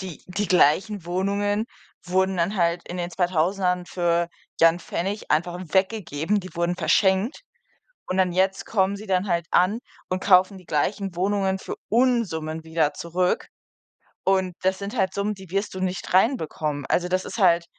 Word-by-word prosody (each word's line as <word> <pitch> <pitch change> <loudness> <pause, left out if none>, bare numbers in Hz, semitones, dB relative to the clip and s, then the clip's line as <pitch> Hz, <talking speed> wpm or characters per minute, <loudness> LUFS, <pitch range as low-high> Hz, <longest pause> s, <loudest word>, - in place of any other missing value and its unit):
die 185 -5 -8
die 195 +3 -3
gleichen 185 +3 +3
Wohnungen 200 +4 0 0.4
wurden 190 +1 +1
dann 180 +5 0
halt 170 -1 +1
in 175 - -5
den 175 -1 -3
Zweitausendern 180 +1 0
für, 170 -1 0 0.3
ja, 165 - +9
'n 170 - -6
Pfennig 195 +4 -4
einfach 175 +3 +1 0.2
weggegeben, 190 -2 +1
die 185 0 -11
wurden 170 +1 0
verschenkt. 190 - +2 0.7
Und 185 - -1
dann 185 -2 +3
jetzt 190 +2 +1
kommen 195 -2 +1
sie 215 +2 -10
dann 185 0 +1
halt 170 -1 0
an 195 +6 +3 0.3
und 185 0 -2
kaufen 190 0 +4
die 185 - -16
gleichen 185 +5 -1
Wohnungen 190 +1 0
für - - -6
Unsummen 200 -11 +1
wieder 160 -2 0
zurück. 180 +2 -1 0.8
Und 190 -2 +1
das 190 0 +1
sind 200 +4 -5
halt 190 -3 +1
Summen, 205 +1 -1
die 190 -3 -13
wirst 195 +1 -2
du - - -4
nicht 185 -1 -3
reinbekommen. 160 - +1
Also, 180 0 +1
das 185 +1 -1
ist - - -6
halt 175 -4 +4
185 Hz, 170 wpm, -24 LUFS, 175-195 Hz, 0.8 s, ja